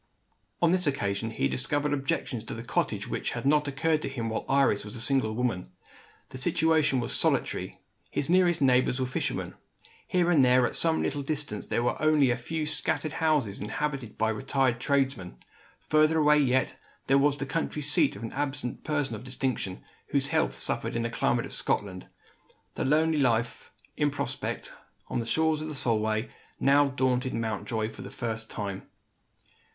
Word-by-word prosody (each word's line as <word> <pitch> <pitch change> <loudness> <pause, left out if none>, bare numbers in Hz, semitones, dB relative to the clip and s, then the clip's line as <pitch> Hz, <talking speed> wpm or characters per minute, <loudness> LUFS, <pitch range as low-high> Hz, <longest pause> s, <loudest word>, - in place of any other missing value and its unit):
On 170 - +5
this 180 -2 +1
occasion, 105 -5 -1
he 110 - 0
discovered 145 +2 -1
objections 135 -4 -2
to - - -5
the 115 - -6
cottage 115 - -1
which - - -3
had - - -5
not 150 +1 +3
occurred 155 +3 +1
to - - -3
him 120 -4 -3
while 110 - -3
Iris 135 -6 +3
was 105 +2 -7
a - - -5
single 115 -3 +1
woman. 115 -7 -1 0.6
The 130 - -4
situation 155 0 +2
was 120 - -2
solitary; - - 0 0.3
his 140 - -2
nearest 175 -2 +3
neighbours 130 0 +3
were 130 - +1
fishermen. 125 - -3 0.5
Here 175 -1 +2
and 150 -6 +5
there, 125 0 +5
at - - -2
some 165 -1 +2
little 145 0 -1
distance, 145 -7 -4
there 120 - 0
were 120 - -1
only 155 -4 +4
a - - +1
few 155 +6 -3
scattered 155 0 -1
houses 150 -11 0
inhabited 135 +2 -3
by 110 0 +1
retired 130 +2 0
tradesmen. 135 -9 0 0.4
Further 155 +1 +3
away 150 -1 +5
yet, 130 -2 +2 0.3
there 135 +1 +4
was 145 0 +3
the 135 - -3
country 150 +1 -2
seat 150 - +2
of 100 - -9
an 115 - -5
absent 140 -3 -3
person 145 -5 -1
of 110 - -6
distinction, 125 -7 -3 0.2
whose - - 0
health - - +1
suffered - - -1
in 115 - 0
the 115 - -2
climate - - +1
of - - -8
Scotland. 95 -3 -2 0.7
The - - -3
lonely 155 +2 +3
life 120 -3 0 0.2
in 150 -1 +2
prospect, 145 - -4 0.4
on - - -1
the 115 - -4
shores 160 +4 +1
of 155 - -4
the 155 - -5
Solway, 110 -2 +1 0.3
now 140 +1 +5
daunted 130 -1 0
Mountjoy 110 0 -2
for - - -11
the - - -7
first 115 -1 -4
time. 100 -3 -5
135 Hz, 180 wpm, -28 LUFS, 115-150 Hz, 0.7 s, On